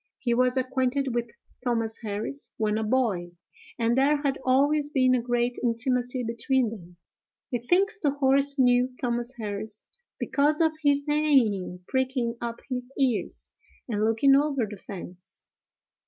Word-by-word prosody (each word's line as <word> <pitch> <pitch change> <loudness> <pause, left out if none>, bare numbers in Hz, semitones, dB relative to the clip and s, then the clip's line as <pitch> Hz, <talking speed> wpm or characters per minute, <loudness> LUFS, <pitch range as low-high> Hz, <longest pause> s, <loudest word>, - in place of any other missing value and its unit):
He 240 -2 0
was 250 +1 +2
acquainted 260 0 0
with 240 0 -1 0.3
Thomas 230 -3 -1
Harris 220 +6 -5
when 215 -1 0
a - - -1
boy, 210 -7 0 0.4
and 230 0 +1
there 285 +2 +2
had 275 -1 0
always 285 +3 +2
been 260 -4 +3
a 250 - +2
great 240 0 -1
intimacy 245 +1 0
between 235 +1 0
them. 175 -5 -11 0.5
He 245 - 0
thinks 390 - +2
the 295 - +2
horse 280 0 +2
knew 250 0 +3
Thomas 240 -1 -2
Harris, 215 0 -6 0.3
because 295 +2 +1
of 320 -1 +4
his 285 0 +2
neighing, 255 -12 +2
pricking 260 -3 -1
up 235 -1 -4
his 250 -1 -4
ears, 255 -5 -1 0.4
and 215 -3 -1
looking 225 +5 +4
over 280 -4 +2
the 205 0 -8
fence. 185 -2 -9
250 Hz, 145 wpm, -26 LUFS, 230-275 Hz, 0.5 s, of